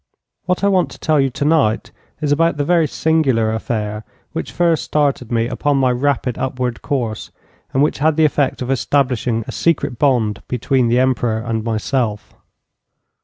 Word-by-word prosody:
What 180 +2 0
I - - +4
want 185 -3 +2
to - - -13
tell 155 -2 +2
you 135 -1 +2
tonight 140 -4 +1 0.3
is 150 -1 0
about 165 +2 +2
the 145 - 0
very 170 -1 +3
singular 135 -10 +1
affair 105 -1 -3 0.3
which - - -4
first 170 -2 +1
started 140 -5 0
me 115 -1 +1
upon 140 +3 0
my 130 -2 +3
rapid 130 -1 -1
upward 125 -2 -2
course, 120 -6 -3 0.4
and 135 - +2
which 150 - 0
had 155 +1 +2
the 160 - +5
effect 145 -3 0
of 125 - -3
establishing 125 -3 0
a - - -4
secret 150 -7 0
bond 120 -8 +1
between 125 0 +1
the 120 +1 +2
Emperor 125 -3 +1
and 110 -1 -3
myself. 110 -1 -2
130 Hz, 170 wpm, -18 LUFS, 115-150 Hz, 0.4 s, the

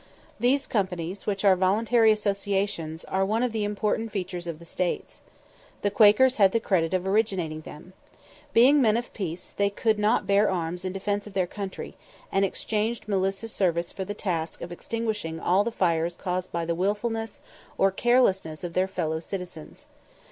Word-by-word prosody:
These 265 +3 +2
companies, 185 -3 -2
which 200 -1 -1
are 195 -1 +7
voluntary 220 +5 +3
associations, 200 -6 -1
are 190 0 0
one 220 +5 +1
of 250 - 0
the 220 -1 -1
important 210 +2 -1
features 180 -3 -4
of 165 -2 -4
the 170 - -14
States. 180 +1 -3 0.6
The 205 - +1
Quakers 215 +5 +5
had 195 -3 +5
the 230 - +3
credit 185 -5 +1
of 185 0 -1
originating 190 -7 0
them. 155 +4 -12 0.6
Being 275 +5 +6
men 220 -2 +4
of 240 - -5
peace, 180 -3 -5
they 200 0 +2
could 215 +1 0
not 210 +3 +2
bear 200 +1 +3
arms 175 -1 -2
in 185 - -2
defence 205 +2 -2
of 205 - -11
their 185 -2 +1
country, 195 +1 -6 0.4
and 195 - +2
exchanged 215 +4 -1
militia 195 +1 -1
service 170 -5 0
for 190 - -5
the 205 +2 -5
task 170 -6 -3
of 170 - -7
extinguishing 210 -4 -3
all 185 +4 +3
the 235 - -2
fires 170 -4 0
caused 180 0 -3
by 170 -1 -2
the 170 - 0
wilfulness 210 +4 -2 0.4
or 195 0 +4
carelessness 190 -8 +2
of 175 -1 -5
their 185 +2 +2
fellow 160 -4 -2
citizens. 175 -2 -8
195 Hz, 175 wpm, -26 LUFS, 175-215 Hz, 0.6 s, are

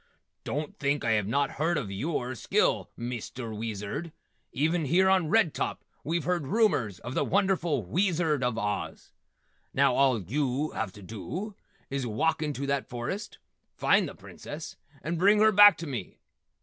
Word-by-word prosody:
"Don't 150 +1 -4
think 140 -1 0
I 115 - +2
have 105 -3 +1
not 140 +5 +1
heard 170 +1 +2
of 105 -9 -3
yewer 125 +4 -2
skill, - - +1
Mister 120 -1 -5
Weezard. 110 - -4 0.4
Even 160 +4 +1
here 180 +7 +4
on 190 -4 +3
Red 210 -5 +3
Top - - -3 0.2
we've 165 +3 -1
heard 175 -6 -1
rumors 180 - +2
of 125 +3 -6
the - - +1
wonderful 175 - +1
Weezard 160 - +1
of 125 -3 0
Oz. 105 -2 -3 0.6
Now - - +4
all 135 -4 +3
yew 135 - -1
have 110 -4 -3
to 105 - -12
dew 175 - -6 0.4
is 135 -2 -2
walk 155 +9 0
into 145 -3 -2
that 140 -1 -1
forest, 135 - -5 0.4
find - - +3
the - - -11
Princess 155 +1 -9 0.3
and 165 +1 -2
bring 200 +4 +5
her 220 0 +6
back 205 0 +8
to 170 - -6
me. 135 -6 -6
145 Hz, 160 wpm, -28 LUFS, 120-170 Hz, 0.6 s, back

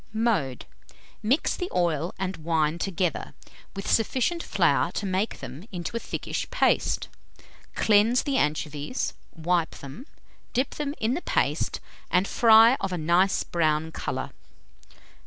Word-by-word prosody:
Mode. 210 - 0 0.6
Mix 240 +8 +1
the 360 0 -4
oil 170 -1 +1
and 190 -1 -3
wine 160 0 0
together, 180 -4 -2 0.4
with 195 +1 -5
sufficient 260 +9 +1
flour - - +2
to - - -3
make 195 +3 -1
them 130 +5 -8
into 180 +4 -5
a - - 0
thickish - - -4
paste; - - +1 0.7
cleanse 220 +3 +4
the 280 - -1
anchovies, 150 - -1 0.2
wipe 170 0 0
them, 145 - -10 0.5
dip 255 +2 0
them 295 -1 -4
in 225 +3 +1
the 335 - -2
paste, - - 0 0.3
and 190 +2 +2
fry 230 +2 +6
of 195 - -2
a 180 - -2
nice 175 +4 +2
brown 160 -1 0
colour. - - -4
190 Hz, 135 wpm, -26 LUFS, 160-230 Hz, 0.7 s, fry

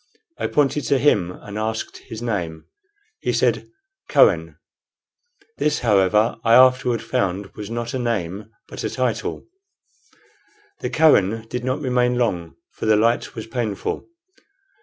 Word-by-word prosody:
I - - 0
pointed 145 -1 +1
to 140 - +2
him 105 -11 +2
and 105 +3 -8
asked 110 0 -3
his 115 +1 -9
name. 85 -9 -3 0.5
He - - -1
said, - - +1 0.4
"Kohen." - - +3 1.0
This, 150 0 +1
however, 105 0 +3
I 115 0 +5
afterward 125 -2 +4
found 95 +1 -2
was 105 -1 -7
not 120 +1 -4
a 130 - -2
name, 105 -4 -3 0.2
but - - -7
a - - -1
title. 125 -4 -2 1.3
The - - -3
"Kohen" 115 -9 +3
did 125 0 -4
not 130 +3 -1
remain 125 -2 +1
long, 90 -9 -1 0.2
for - - -5
the 110 - +5
light 115 +3 +1
was 110 - -6
painful. 115 -4 -3
115 Hz, 140 wpm, -22 LUFS, 105-125 Hz, 1.3 s, I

